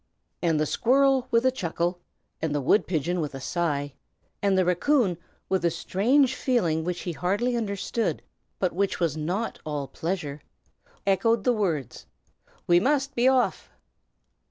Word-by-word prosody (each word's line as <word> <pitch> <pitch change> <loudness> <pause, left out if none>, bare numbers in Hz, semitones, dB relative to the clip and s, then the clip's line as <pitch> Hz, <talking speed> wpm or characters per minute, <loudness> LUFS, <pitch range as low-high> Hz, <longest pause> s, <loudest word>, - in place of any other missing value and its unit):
And 165 -3 +2
the 155 - +2
squirrel 265 - +3
with 230 0 +2
a 260 - +5
chuckle, 175 -5 -2 0.4
and 155 -2 -1
the - - +1
wood 145 +10 +2
pigeon 170 +1 -1
with 145 -3 -4
a - - -5
sigh, 145 -2 -2 0.5
and 200 -1 +2
the 185 - +3
raccoon 190 - +2 0.3
with 190 -2 0
a 170 - +4
strange 235 - +2
feeling 175 -13 0
which 175 +1 -3
he 175 - -3
hardly 205 +9 0
understood, 210 0 -2 0.3
but 185 -2 0
which 195 +2 -1
was 165 -4 0
not 180 +9 -3
all 150 -3 -3
pleasure, 155 -1 -4 0.6
echoed 200 +3 +2
the 250 - +3
words, 170 - -2 0.6
"We 175 0 +5
must 275 +4 +1
be 245 +2 +2
off!" 260 -1 +2
185 Hz, 155 wpm, -26 LUFS, 165-235 Hz, 0.6 s, a